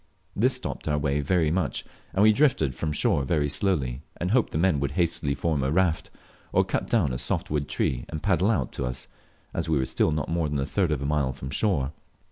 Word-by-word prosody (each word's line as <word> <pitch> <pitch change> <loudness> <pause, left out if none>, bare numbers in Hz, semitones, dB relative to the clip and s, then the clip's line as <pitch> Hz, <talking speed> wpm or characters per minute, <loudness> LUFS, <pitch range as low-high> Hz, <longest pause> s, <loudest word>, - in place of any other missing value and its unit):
This 125 +6 +3
stopped - - -5
our 75 -1 +1
way 70 0 0
very 80 +1 +2
much, 90 -2 -1 0.3
and 100 - +2
we 110 0 +7
drifted 105 - +2
from 75 +5 -3
shore 70 -1 +2
very 75 0 +1
slowly, 70 -6 -1 0.2
and 90 +2 -2
hoped 120 0 +2
the - - -2
men 85 -3 +2
would 70 0 -2
hastily 80 -4 +1
form 75 0 0
a 65 - 0
raft, 85 -1 +1 0.4
or - - +3
cut - - -2
down 90 - +2
a 60 - -2
soft - - -1
wood 75 -1 -1
tree, 60 -2 -1
and 80 - -5
paddle 95 -1 +2
out, 70 - 0
to 65 - -3
us, 65 0 -4 0.5
as - - -2
we 80 - +3
were 65 - +1
still 80 - +1
not 75 -2 -1
more 80 -2 0
than 75 - -1
a 70 - 0
third 90 -1 0
of 70 -2 -1
a - - -2
mile 70 -3 +1
from 65 +2 -7
shore. 75 -5 +1
75 Hz, 235 wpm, -26 LUFS, 70-90 Hz, 0.5 s, we